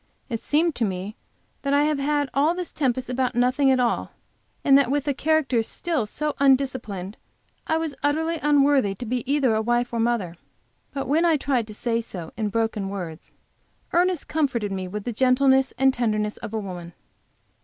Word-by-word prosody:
It 230 -2 -2
seemed 320 +6 +1
to 240 - 0
me 195 +1 -3 0.5
that 280 -1 -1
I 290 - +4
have 300 -1 +1
had 290 0 +1
all 300 +5 +2
this 360 -1 -5
tempest 260 -3 -1
about 250 0 -1
nothing 255 +3 +3
at 260 -1 +3
all, 240 -2 0 0.5
and 275 - +6
that 275 -3 +4
with 285 +1 0
a 285 - +2
character 290 -4 +1
still 285 +1 -2
so 300 +7 -2
undisciplined, 255 -8 +1 0.5
I 320 - +2
was 320 -2 -2
utterly 320 +3 0
unworthy 280 -8 +3
to 240 - -7
be 245 +1 -2
either 275 -5 +3
a 220 - +1
wife 240 +1 0
or - - -1
a - - -1
mother. 225 -7 0 0.5
But 275 -1 -4
when 310 +5 +2
I 330 -3 +4
tried 260 -5 0
to 215 - -10
say 230 +1 -1
so 180 -7 -8
in 215 -2 -1
broken 220 -2 -1
words, 175 -5 -7 0.6
Ernest 355 -2 +1
comforted 255 -10 0
me 190 -1 -3
with 205 +3 -5
the 240 - -3
gentleness 265 +2 +3
and 265 +1 +4
tenderness 215 -3 -1
of - - -7
a - - 0
woman. 175 -4 -7
255 Hz, 190 wpm, -24 LUFS, 220-290 Hz, 0.6 s, and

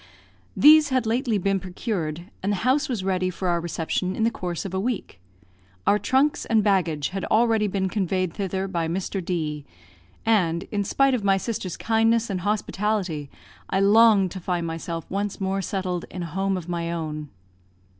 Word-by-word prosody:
These 305 0 +7
had 255 -2 +1
lately 230 0 +1
been 195 0 +1
procured, 180 -3 -4
and 200 - 0
the - - +1
house 275 +4 +2
was 235 -6 -1
to - - -6
be - - 0
ready 185 -1 +1
for 185 +1 -4
our 170 -1 +1
reception 175 +2 -2
in 225 - -1
the 230 - +3
course 175 -4 -4
of 190 - -5
a 190 - 0
week. 215 - -3 0.7
Our 205 - +4
trunks 275 +6 +2
and 220 -2 +2
baggage 170 -8 +1
had 195 0 -4
already 225 -1 +3
been 190 -1 -1
conveyed 185 -2 -1
thither 195 -1 -2
by 170 -4 -1
Mr. 185 +2 -3
D; 155 -4 -2 0.6
and, 180 -7 +2
in 205 -2 0
spite 275 +6 +2
of 240 -5 -1
my 195 -1 +3
sister's 195 -4 -4
kindness 225 0 +2
and 185 -2 -2
hospitality, 200 -6 -1 0.4
I 190 - +1
longed 205 -2 +5
to 190 - -6
find 175 -1 -2
myself 165 0 -4
once 200 +1 -3
more 195 0 -1
settled 185 -2 -3
in 180 - -5
a 165 -2 -7
home 195 0 0
of 175 -2 -7
my 170 -1 -2
own. 155 -3 -4
190 Hz, 185 wpm, -24 LUFS, 175-215 Hz, 0.7 s, These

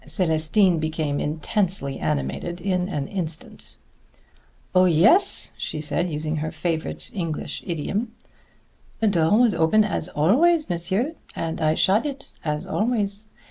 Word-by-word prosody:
Célestine 170 +1 +2
became 155 -2 -1
intensely 160 -1 -1
animated 75 - -2
in 180 0 -1
an 145 -6 -3
instant. 165 -5 -6 1.0
"Oh, 185 0 +5
yes," 185 - +4
she 155 - -4
said, 170 +4 -1
using 155 0 -2
her 155 +1 -2
favorite 160 0 -3
English 165 -6 -3
idiom. 195 +7 -2 0.9
"The 220 - +2
door 170 +1 +3
was 245 -3 +4
open 165 +6 +4
as 195 -5 -2
always, 290 - +3
monsieur, 190 - 0 0.2
and 165 -1 -3
I 155 0 +2
shut 205 - +3
it 275 -1 -7
as 150 +2 -2
always. 210 0 -1
175 Hz, 130 wpm, -24 LUFS, 155-205 Hz, 1.0 s, Oh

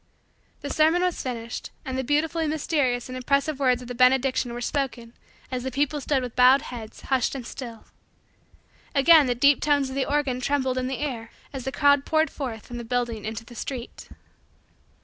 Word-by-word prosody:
The - - -5
sermon 320 +3 +3
was 360 -1 0
finished 230 -3 -5 0.2
and 260 - -4
the 260 - -1
beautifully 315 +4 0
mysterious 290 -5 0
and 255 - -7
impressive 280 +3 0
words 250 -2 +2
of - - -10
the 245 - -5
benediction 255 0 +3
were 240 - -5
spoken 245 -2 -3 0.4
as 255 -1 -2
the 265 - -3
people 290 +3 -1
stood 270 -1 0
with 245 -2 -6
bowed 255 +3 +6
heads, 230 -6 -9
hushed 265 0 0
and 255 -3 -6
still. 235 -3 -8 1.1
Again 290 +1 +7
the 245 - +1
deep 280 +3 +4
tones 285 -2 +2
of 265 - -6
the 275 - -1
organ 275 -4 0
trembled 260 -1 0
in 255 - -2
the 265 -1 -3
air 245 -6 -4 0.2
as 265 -2 -6
the 265 - -2
crowd 285 -1 +4
poured 315 0 +1
forth 240 -7 -5
from 240 0 -7
the - - -6
building 235 -2 -2
into 220 +1 -5
the 240 - -13
street. 240 +1 -7
260 Hz, 190 wpm, -25 LUFS, 245-285 Hz, 1.1 s, Again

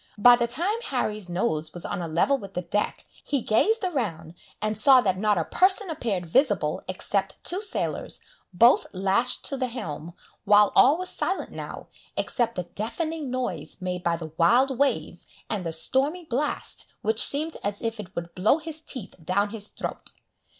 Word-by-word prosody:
By 245 +4 +8
the 235 0 0
time 360 - -1
Harry's 215 -7 -2
nose 160 -4 -1
was 175 - -4
on - - -3
a 170 - -3
level 170 - +2
with 200 -7 -8
the 180 - -2
deck, 205 +5 -2 0.2
he 285 - 0
gazed 430 - +2
around, 200 - -2 0.3
and 215 0 -1
saw 260 +4 +7
that 190 -6 0
not 210 -1 +2
a 165 - 0
person 375 0 +2
appeared 210 - -2
visible 215 - +1
except - - -2
two 365 +3 -1
sailors, 425 - -2 0.3
both 235 +7 +5
lashed 195 +6 +1
to 275 - -1
the 255 -1 -1
helm, 170 - -6 0.3
while 205 0 +5
all 285 +5 +6
was 365 0 0
silent 380 - -2
now, - - -7 0.3
except 235 -2 -1
the 180 - -2
deafening 285 - -4
noise 195 - -4
made 180 -1 -4
by 170 -1 +1
the 160 -2 -8
wild 250 +10 +4
waves 280 -1 0 0.2
and 210 -4 -1
the 165 - -3
stormy 275 - 0
blast, 290 +2 -2
which 220 +1 +4
seemed 310 +3 +4
as 205 0 -2
if 225 -1 -2
it 190 -2 -9
would 170 0 -5
blow 205 +10 +3
his 315 -1 -6
teeth 250 -10 -7
down 200 +5 +1
his 210 -1 -5
throat. - - -6
220 Hz, 180 wpm, -26 LUFS, 180-275 Hz, 0.3 s, By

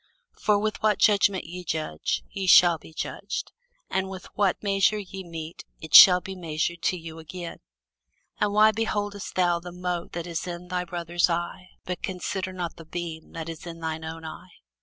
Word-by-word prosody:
For 210 -1 +3
with 215 0 -2
what 215 -2 +3
judgment 200 -2 +4
ye 180 +2 -8
judge, 155 - -2
ye 190 - -3
shall 175 -2 +7
be - - -14
judged: 155 - -4 0.4
and 190 0 -1
with 190 -1 -8
what 200 -1 +1
measure 200 +1 +3
ye 195 -1 -7
mete, 165 -2 -8 0.2
it 160 - -10
shall 180 -1 +11
be 190 +1 -7
measured 170 0 -2
to 180 - +1
you 165 -1 -9
again. 170 +2 -8 0.8
And 210 -1 +2
why 215 +1 +6
beholdest 205 -2 -3
thou 175 -2 +2
the 175 +1 -9
mote 180 -1 -4
that 170 -1 -4
is 170 0 -4
in 175 0 -6
thy 180 0 -1
brother's 175 0 0
eye, 175 +2 -3 0.2
but 180 -1 -4
considerest 185 0 -4
not 175 -2 -4
the 165 - -11
beam 165 -1 -6
that 165 -1 -5
is 165 +1 -7
in 165 -1 -8
thine 160 -1 -4
own 160 0 -7
eye? 175 +3 -9
175 Hz, 185 wpm, -26 LUFS, 165-190 Hz, 0.8 s, shall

